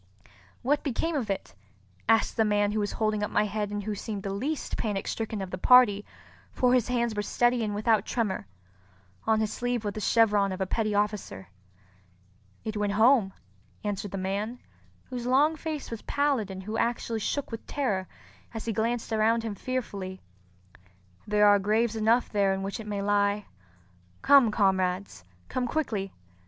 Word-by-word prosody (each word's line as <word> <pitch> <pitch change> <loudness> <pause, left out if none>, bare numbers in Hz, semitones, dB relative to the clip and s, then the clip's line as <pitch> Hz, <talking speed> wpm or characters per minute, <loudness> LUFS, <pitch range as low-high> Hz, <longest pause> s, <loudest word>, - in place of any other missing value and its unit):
"What 290 +3 +2
became 315 +4 -1
of 245 -7 -2
it?" 195 - -3 0.6
asked 225 -1 +3
the 225 - +3
man 205 -1 +2
who 215 - -1
was 205 -1 -1
holding 215 -1 0
up 210 - -1
my 210 - +2
head 210 0 -2
and 205 0 -4
who 215 +1 -2
seemed 205 -1 -5
the 195 - -3
least 275 +10 -3
panic 205 -3 -2
stricken 220 -3 -3
of 185 - -7
the 185 - -5
party, 225 -3 +6 0.5
for 250 -1 +2
his 250 -3 +3
hands 235 -2 0
were 210 - -1
steady 240 +3 +1
and 210 -1 -2
without 215 0 +2
tremor. 210 - -2 0.8
On 220 -1 +3
his 215 -1 -1
sleeve 245 -2 -2
was 205 - -2
the 215 - -5
chevron 210 -3 +3
of 185 - -5
a 190 - 0
petty 215 +2 -1
officer. 205 - -2 1.2
"It 220 0 -3
went 205 -1 0
home," 220 -2 +4 0.5
answered 205 -1 -3
the 195 - -5
man, 200 +5 -2 0.5
whose 245 -1 -4
long 290 +5 +4
face 310 -4 -5
was 230 - -5
pallid 280 -8 0
and 190 0 -7
who 215 +3 -3
actually 230 -1 -1
shook 280 +6 -2
with 230 - -6
terror 205 -10 -1 0.5
as 225 - -5
he 225 - -1
glanced 230 +2 -1
around 225 +1 +2
him 225 -2 -3
fearfully. 200 -5 -4 1.1
"There 210 0 +4
are 205 0 +6
graves 215 +3 +1
enough 225 +3 +3
there 200 -2 +1
in 190 - -4
which 195 +3 -4
it 220 - -8
may 200 -1 -2
lie. 205 0 +1 0.8
Come, 275 -5 +7
comrades—come 185 - -1
quickly! 220 -9 -2
215 Hz, 175 wpm, -28 LUFS, 200-235 Hz, 1.2 s, Come